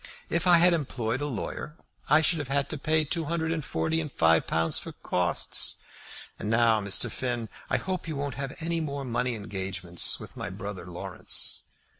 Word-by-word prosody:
If 170 +2 +1
I 175 -1 +8
had 175 +1 +6
employed 130 -5 -1
a 145 - -1
lawyer 145 +4 -4 0.3
I 150 +2 +6
should 160 +1 +3
have 145 - -3
had 140 +1 0
to 155 - -3
pay 155 +2 +2
two 165 +2 -1
hundred 160 +1 -1
and 165 -2 -1
forty 160 +4 0
pounds - - +2
and 150 -3 -5
five 80 -5 +4
pounds 80 0 +2
for - - -7
costs. 90 -1 0 0.6
And 105 - -3
now, 115 -1 +4
Mr. 100 +4 +2
Finn, 120 -3 -2 0.2
I - - +3
hope 185 -2 -3
you 160 - -3
won't 140 -1 -2
have 135 +1 -5
any 165 0 0
more 140 -3 -3
money 125 0 0
engagements 95 -4 0
with - - -10
my - - -4
brother 100 -3 -6
Laurence." 90 +2 -2
135 Hz, 195 wpm, -28 LUFS, 105-160 Hz, 0.6 s, I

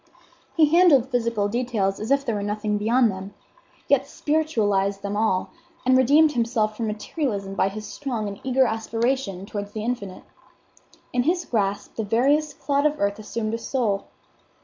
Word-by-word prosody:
He 320 - +7
handled 285 -8 +5
physical 230 -4 0
details 215 -4 -1
as 215 - -5
if 275 0 +2
there 230 - 0
were 205 - -2
nothing 210 0 -1
beyond 230 +2 +3
them; 195 +1 -8 0.5
yet 275 -1 +3
spiritualized 215 -12 0
them 200 0 -3
all, 210 -3 0 0.3
and 255 0 +5
redeemed 290 +5 +5
himself 230 -4 0
from 225 0 -3
materialism 210 -2 -3
by 195 - +1
his 210 +2 -7
strong 240 -6 -4
and 200 0 -7
eager 260 0 +3
aspiration 225 -3 -1
towards 205 0 -6
the 215 - -4
infinite. 200 -6 -4 0.9
In 250 - +2
his 345 +6 0
grasp 205 -2 -2
the 225 - -1
veriest 275 +7 +1
clod 285 +1 +2
of 300 0 -3
earth 200 +1 0
assumed 215 +1 -3
a 230 - -2
soul. 225 -6 -1
225 Hz, 165 wpm, -24 LUFS, 205-265 Hz, 0.9 s, He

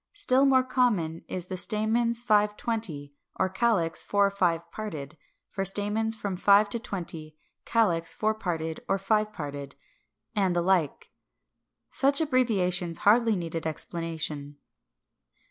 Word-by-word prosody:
Still 280 -10 +3
more 260 -1 +4
common 215 -11 0
is 180 -2 -4
the 185 - -7
form - - -1 0.3
"Stamens 235 0 +1
5 210 -3 +2
20," 165 -12 -3 0.2
or 190 - 0
"Calyx 190 -5 +1
4 200 -1 +2
5 170 -3 0
parted," 155 -9 -6 0.3
for 195 - -3
stamens 210 +3 0
from 200 -3 -4
five 200 +2 +4
to 235 - -1
twenty, 165 -7 -5 0.3
calyx 175 -8 +1
four 215 0 +1
parted 165 -6 -3
or 195 - +2
five 210 +2 0
parted, 145 -6 -7 0.6
and 190 -3 +1
the 175 - +1
like. 175 -5 0 0.8
Such 280 +2 +2
abbreviations 195 - +1
hardly 225 +1 +5
need 170 -3 -5
explanation. 160 -2 -4
195 Hz, 130 wpm, -27 LUFS, 165-225 Hz, 0.8 s, hardly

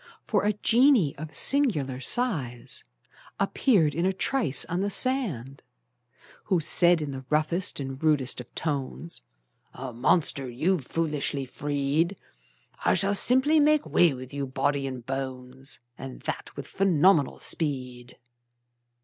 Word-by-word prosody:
For - - -1
a 210 - +1
genie 230 - +2
of 155 0 -7
singular 155 - +3
size 135 - -3 0.6
Appeared 195 - +1
in 170 +4 -2
a 190 - +1
trice 200 - 0
on 175 +2 -3
the 200 - -1
sand, 190 - -1 0.8
Who 185 -4 +1
said 170 +1 +4
in 145 - -5
the 135 -1 -8
roughest 155 +4 0
and 135 +1 -7
rudest 145 -5 +1
of 125 - -16
tones: 150 +2 -5 0.5
"A 130 -1 -7
monster 135 +1 +2
you've 150 +5 -1
foolishly 150 -4 -2
freed! 145 +7 -2 0.7
I - - +2
shall 200 +1 +2
simply 260 +9 +4
make 300 0 +2
way 175 -2 +3
with 130 0 -9
you, 140 -1 -4
body 135 +1 -2
and 130 -3 -8
bones, 130 0 -7 0.2
And 135 -1 -9
that - - -6
with - - -7
phenomenal 180 -5 +2
speed!" 125 -5 -1
150 Hz, 130 wpm, -26 LUFS, 135-190 Hz, 0.8 s, said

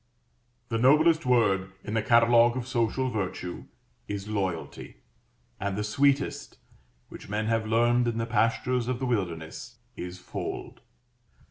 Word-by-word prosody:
The 115 -2 -1
noblest 155 +4 +4
word 95 -6 +2
in 105 - -5
the 110 - +1
catalogue 120 +1 +5
of 125 -1 -4
social 130 +1 0
virtue 95 -4 -4 0.4
is 100 0 -5
"Loyalty," 95 -6 -4 0.6
and 100 0 -2
the 105 - -1
sweetest 140 +5 0 0.5
which - - -11
men 105 +1 -1
have 115 0 0
learned 120 +2 +3
in 115 -1 -1
the 115 - -1
pastures 115 +2 0
of 125 -1 -1
the 130 - -3
wilderness 95 0 -3 0.2
is 90 +1 -6
"Fold." 90 - -6
115 Hz, 135 wpm, -27 LUFS, 105-125 Hz, 0.6 s, catalogue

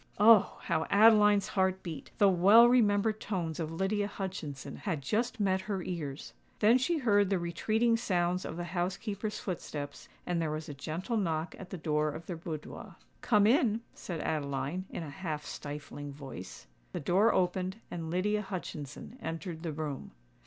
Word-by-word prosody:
Oh! 215 0 +6
how 160 - 0
Adeline's 210 -1 +6
heart 190 -1 +1
beat,—the 180 +5 0
well 200 +6 +7
remembered 215 -3 +3
tones 170 -6 -3
of 160 -1 -3
Lydia 195 +4 0
Hutchinson 180 -9 -6
had 160 -8 -3
just 230 - -1
met 190 -2 +2
her 195 -2 -3
ears. 155 -6 -5 0.2
Then 225 +4 +5
she 330 +6 +1
heard 205 -8 +3
the 195 - +2
retreating 220 +7 +1
sounds 180 -5 0
of 160 - -6
the 175 - -3
housekeeper's 195 +5 -3
footsteps; 145 -6 -6 0.2
and 175 -1 0
there 160 - 0
was 155 +1 -4
a 145 - -6
gentle 160 - -3
knock 165 -4 -1
at 190 - -9
the 190 - -5
door 155 -2 0
of 160 +2 -7
their 175 - -4
boudoir. 160 -2 -7 0.3
"Come 210 -3 +4
in," 230 -1 +3
said 170 -4 -5
Adeline, 145 +4 -2
in - - -5
a 155 - -7
half 155 -2 -4
stifling 145 0 -7
voice. 135 - -9 0.3
The - - -2
door 190 +9 +3
opened, 185 +1 0 0.2
and 165 -2 -4
Lydia 205 +5 +1
Hutchinson 185 - -7
entered 165 -2 -5
the 165 -2 -3
room. 150 - -5
180 Hz, 165 wpm, -31 LUFS, 160-205 Hz, 0.3 s, well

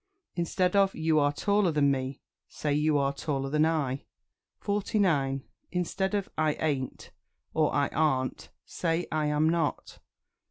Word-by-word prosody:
Instead 180 +2 0
of 195 -1 +4
"You 160 -1 +2
are 145 0 +3
taller 200 +3 +2
than 145 -2 +3
me," 130 0 -3 0.3
say 150 -1 -2
"You 150 0 +2
are 140 0 +1
taller 135 -2 -3
than 155 +1 +3
I." 140 -4 -1 0.5
49. 180 -10 0 0.3
Instead 190 +2 -1
of 200 -1 -1
"I 155 -1 +3
ain't," 140 -5 -3 0.4
or 155 -1 +2
"I 140 0 +2
arn't," 135 -5 0 0.2
say 165 0 -1
"I 155 -1 0
am 150 +1 +2
not." 165 -2 -1
155 Hz, 145 wpm, -28 LUFS, 140-175 Hz, 0.5 s, of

